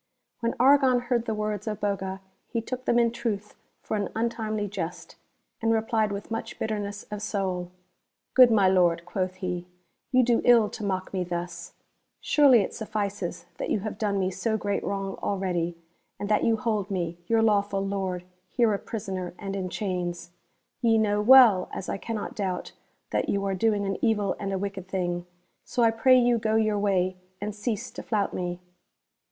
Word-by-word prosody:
When 230 -1 -1
Argon 265 -1 +5
heard 240 -1 0
the 220 - 0
words 210 0 -3
of 210 -2 -2
Boga 190 -1 -2 0.3
he 235 - -2
took 255 +3 -5
them 235 - +3
in 235 -1 +4
truth 225 -4 -3 0.3
for - - -2
an 205 -2 -1
untimely 220 -2 -1
jest, 180 -4 -6 0.5
and 225 0 +2
replied 220 -1 +1
with 200 +2 -6
much 225 - -4
bitter 215 -1 -2
ness 205 0 -5
of 210 -1 -4
soul: 190 -4 -2 0.3
" - - -55
Good 255 -2 +9
my 205 -4 +4
Lord," 175 -2 +3
quoth 185 +1 -2
he, 180 -2 -4 0.2
" - - -50
you 255 -1 +5
do 235 -1 +3
ill 235 -4 +6
to 225 - -7
mock 190 -2 -2
me 185 -2 0
thus! 175 -1 -5 0.5
Surely 275 -6 +5
it - - -3
suffices 205 -5 -3
that - - -3
you 205 - +1
have 215 +1 -5
done 205 -2 0
me 190 -1 0
so 220 +4 -1
great 205 -1 -2
wrong 195 -1 -3
already, 175 -4 -1 0.4
and 205 - -3
that 210 - +3
you 225 -1 +3
hold 215 -4 -1
me, 175 -3 -3
your 225 +1 +3
lawful 200 -2 +2
Lord, 190 -2 -2 0.3
here 235 -2 +2
a 200 - -1
prisoner 190 -5 -5
and 195 -1 -5
in 185 -2 -3
chains! 175 -3 -3 0.5
Ye 225 -2 +4
know 210 -1 +2
well, 230 -5 +7
as 185 - -5
I - - -1
cannot 220 -1 -4
doubt, 190 -3 -3 0.4
that - - 0
you 200 0 0
are 195 - 0
doing 205 +1 +1
an 195 -1 -3
evil 210 -4 +2
and 195 -1 -3
a 195 - 0
wicked 195 -1 -5
thing, 175 -2 -2 0.4
so 240 - 0
I 225 - +5
pray 255 +3 +5
you 240 -1 +3
go 220 0 0
your 215 -2 +2
way, 185 -2 +1 0.2
and 210 +1 -4
cease 210 0 -3
to - - -7
flout 210 -3 -1
me." 175 -1 -3
205 Hz, 190 wpm, -27 LUFS, 190-225 Hz, 0.5 s, Good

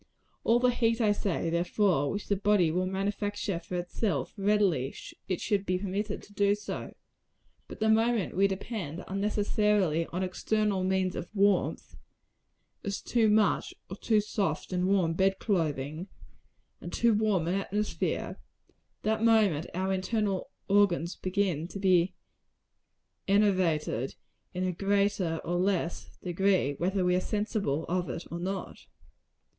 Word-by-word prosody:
All 230 - +4
the 250 0 +4
heat, 230 -1 +1
I 215 -3 +3
say, 195 -5 -1
therefore, 170 -3 +1
which 205 - -3
the 200 - +2
body 195 -4 +3
will 180 +2 0
manufacture 200 0 -2
for 180 - -7
itself, 175 - -2
readily, 195 - +1 0.3
it 185 - -1
should 205 -3 0
be 185 -2 0
permitted 200 +2 -3
to 205 - -16
do. 205 0 +3 1.1
But - - -10
the 220 - +1
moment 225 -2 +2
we 195 +2 +4
depend, 190 -4 -5
unnecessarily, 205 -4 +1
on 180 +2 -3
external 200 +1 0
means 185 -1 0
of 175 - -5
warmth 200 -1 +1 0.9
as 200 -1 -3
too 230 -3 +2
much 210 -1 +2 0.2
or - - -3
too 215 +1 +2
soft 195 -5 -2
and 180 0 +1
warm 185 -4 +2
bed 190 +2 +2
clothing, 155 -4 -1 0.7
and 175 - -7
too 235 +4 +3
warm 205 -6 +1
an 175 - +1
atmosphere 205 +2 -2 0.6
that 220 +1 0
moment 210 -9 +3
our 190 +1 0
internal 195 0 -1 0.2
organs 195 -4 +2
begin 185 -4 -1
to 190 - -8
be 185 -2 +3 1.1
enervated, 185 - +1 0.4
in 180 0 -3
a 185 - +1
greater 195 -3 0
or 175 +1 -1
less 180 -2 -1
degree, 180 -4 +1
whether 185 +1 +1
we 180 0 +3
are 180 - +1
sensible 205 - -1
of 180 0 -1
it 170 - -5
or 170 - -4
not. 190 +2 -5
195 Hz, 140 wpm, -29 LUFS, 175-205 Hz, 1.1 s, All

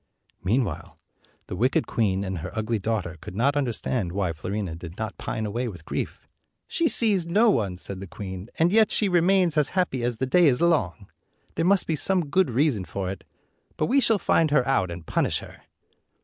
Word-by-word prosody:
Meanwhile 100 - -1 0.5
the - - -6
wicked - - +1
queen 100 -4 0
and 95 -3 -4
her 85 +4 -5
ugly 110 0 -1
daughter 95 -5 -2
could - - -9
not 135 +7 +2
understand 120 -7 -1
why 95 -4 -1
Fiorina 95 +1 -4
did 85 +1 -9
not 110 -1 -4
pine 110 - -3
away 120 +4 -2
with 85 -8 -9
grief. - - -5 0.4
"She 335 - +1
sees 205 - +2
no 215 +6 +4
one," 100 - -1
said 95 +1 -6
the 95 - -7
queen, 95 +2 -7
"and 165 +2 +3
yet 220 -1 +5
she 210 - +2
remains 180 -2 +3
as 150 -2 +3
happy 135 -9 0
as 120 -1 -1
the 130 - -1
day 170 +6 +4
is 125 -3 +3
long. 155 - +2 0.6
There - - -2
218 - - +3
must 195 -1 +4
be 160 - 0
some 175 -1 +1
good 190 0 +3
reason 125 -4 +1
for 95 0 -4
it; 95 -1 -8 0.5
but 155 - +1
we 270 - +3
shall 225 -4 +3
find 165 -4 +2
her 145 -4 +2
out 115 -9 +1
and 85 -1 -8
punish - - 0
her." - - -11
120 Hz, 205 wpm, -25 LUFS, -, 0.6 s, yet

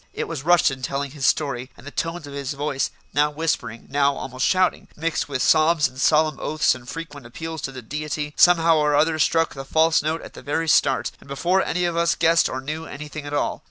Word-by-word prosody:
It - - -3
was 165 -5 -5
Rushton 160 -4 +3
telling 140 +2 -3
his 140 -2 -1
story, 135 -4 0
and - - -15
the 145 - -8
tones 165 +1 -3
of 145 - -10
his 140 -1 -4
voice, 140 -1 -2 0.2
now 145 +1 +3
whispering, 150 -7 -3
now 140 0 +2
almost 130 0 -2
shouting, 185 -1 +1
mixed 165 -1 -2
with 130 -2 -1
sobs 155 -1 +4
and 130 - -13
solemn 155 0 +3
oaths 155 -1 +1
and 125 -1 -11
frequent 145 -6 -8
appeals 160 +5 -6
to 135 - -4
the 130 -2 -9
Deity, 150 +3 -4
somehow 165 -2 +5
or 150 -1 +2
other 155 +2 +2
struck 165 +2 +2
the 135 - -7
false 160 +4 +3
note 155 +2 -2
at - - -11
the - - -11
very 160 +3 -2
start, 135 -3 +2
and - - -18
before 175 +8 +1
any 180 +1 -1
of 170 -1 -1
us 170 0 +2
guessed 165 +1 +3
or 130 - -4
knew 155 +4 -5
anything 150 0 -8
at 145 - -6
all. - - -1
150 Hz, 225 wpm, -23 LUFS, 140-165 Hz, 0.2 s, somehow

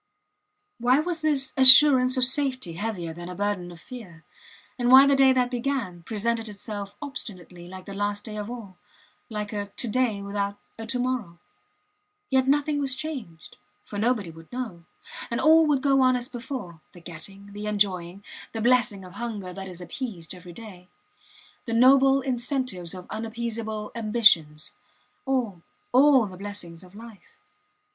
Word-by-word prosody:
Why 250 +3 +3
was 335 +1 -2
this 290 -4 +2
assurance 260 -1 +7
of 255 - +3
safety 255 - +4
heavier 175 -3 -4
than 175 +2 -9
a 180 - -7
burden 200 -2 -2
of 170 - -12
fear, 180 -8 -11 0.6
and 245 0 +1
why 265 +2 +9
the 280 0 +4
day 270 -1 +5
that 250 -1 +1
began 240 -8 -3
presented 225 +3 -2
itself 205 -1 -7
obstinately 180 - -8
like 185 0 -10
the 200 - -8
last 205 +1 -2
day 215 -2 -7
of 210 0 -5
all 210 -7 -9 0.5
like 210 -1 -5
a 205 -1 -3
to 205 +4 -5
day 220 -3 0
without 200 0 -3 0.2
a 225 - -6
to 250 - -1
morrow? 245 -9 -3 0.9
Yet 265 0 +2
nothing 290 +1 +1
was 270 -2 0
changed, 255 - -8 0.3
for 205 - -6
nobody 215 -6 0
would 165 0 -15
know; 220 -10 -6 0.4
and 235 - -2
all 320 0 +5
would 280 -3 +1
go 275 -1 +3
on 255 -1 +4
as 245 0 -3
before 240 - -7
the 175 - -13
getting, 195 +4 -11
the 210 +1 -6
enjoying, 195 -3 -1 0.3
the 225 - -4
blessing 230 -5 +2
of 180 - -12
hunger 210 -5 -6
that 190 +1 -7
is 180 -1 -9
appeased 185 - -6
every 180 -1 -12
day; 180 -2 -12 0.8
the 230 - -2
noble 270 +3 +5
incentives 250 - -2
of 180 -1 -9
unappeasable 220 -1 -4
ambitions. 210 -10 +2 0.5
All 235 -10 -1 0.3
all 265 -1 +5
the 185 -2 -9
blessings 190 -4 -8
of 185 +2 -17
life. 225 -2 -14
220 Hz, 160 wpm, -25 LUFS, 185-255 Hz, 0.9 s, why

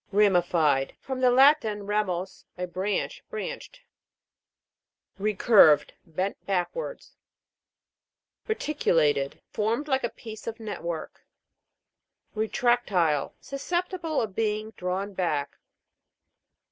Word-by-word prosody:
RA'MIFIED. 175 -9 +3
From 265 -1 -5
the 255 - +5
Latin, 245 -6 +4
ramus, 190 -3 -2
a 180 - -2
branch. 195 - -3
Branched. - - -6 1.4
RECU'RVED. 200 -6 +5 0.2
Bent 185 +5 -3
backwards. 200 - -3 1.3
RETI'CULATED. 160 - +1
Formed 230 +7 -1
like 265 -2 +1
a 240 - 0
piece 220 -2 -10
of 230 0 -4
net 220 -2 -6
work. 170 -1 -6 1.1
RETRAC'TTLE. 215 - +1
Susceptible 345 +3 -2
of 210 -3 -5
being 215 0 -1
drawn 190 +1 -3
back. 160 -6 -2
210 Hz, 90 wpm, -27 LUFS, 180-250 Hz, 1.4 s, the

